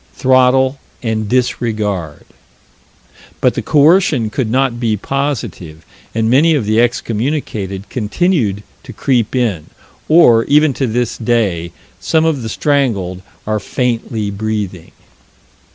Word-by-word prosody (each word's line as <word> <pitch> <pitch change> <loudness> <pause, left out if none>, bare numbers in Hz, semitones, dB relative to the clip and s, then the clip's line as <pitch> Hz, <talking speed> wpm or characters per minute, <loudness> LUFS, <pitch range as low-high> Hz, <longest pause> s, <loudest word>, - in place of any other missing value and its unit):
Throttle 130 +1 +3 0.2
and 110 -2 -2
disregard. 110 -9 -2 1.1
But - - +2
the - - -3
coercion 150 - +3
could 120 -1 -2
not 130 0 0
be 110 -3 0
positive, 105 - -4 0.3
and 110 -1 +1
many 150 +7 +4
of 130 -7 -1
the 110 +2 +2
excommunicated 115 -5 -2
continued 115 - 0 0.2
to - - -11
creep 125 -3 0
in; 110 -11 -1 0.4
or, 120 -9 +6
even 150 0 +3
to 135 0 -1
this 120 +1 -2
day, 105 -8 0 0.3
some 160 -1 +1
of 155 -5 0
the 110 - -5
strangled 110 -12 0 0.2
are 110 0 -1
faintly 115 -2 -2
breathing. 100 -4 -4
115 Hz, 120 wpm, -15 LUFS, 105-135 Hz, 1.1 s, or